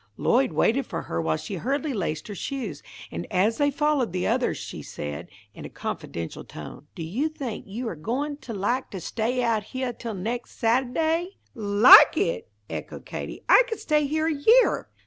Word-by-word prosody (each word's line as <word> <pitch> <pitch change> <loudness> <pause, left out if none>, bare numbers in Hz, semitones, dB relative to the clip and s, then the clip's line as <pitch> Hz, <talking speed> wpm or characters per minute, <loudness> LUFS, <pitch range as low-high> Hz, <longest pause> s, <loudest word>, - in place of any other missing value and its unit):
Lloyd - - +2
waited - - +2
for - - -4
her 85 - -3
while 80 -1 0
she 195 - -6
hurriedly 280 - -1
laced 165 -7 -3
her 210 - -6
shoes, 210 - -5 0.3
and 85 +1 -5
as 210 +7 +2
they 290 0 +4
followed 290 - 0
the 180 - -1
others - - +1
she - - -7
said, 75 0 -6 0.2
in - - -10
a - - -7
confidential 85 -1 -5
tone, 145 - -10
"Do 165 - -5
you 240 - -1
think 265 -8 -6
you 230 +5 -5
are 200 - -4
goin' 265 - -3
to 265 -4 -9
like 225 +6 -1
to 190 - -6
stay 235 +7 -1
out 225 -3 +1
heah 260 0 -3
till 230 -2 -6
next 230 +6 -5
Sata'day?" 315 - +1 0.2
"Like 210 -1 +8
it!" 475 -2 -1 0.2
echoed - - -7
Katie, - - -6
"I - - +8
could 450 - -4
stay 300 -1 +1
here 315 +2 0
a 325 - +1
year!" 445 +13 +4
240 Hz, 185 wpm, -25 LUFS, 200-290 Hz, 0.3 s, Like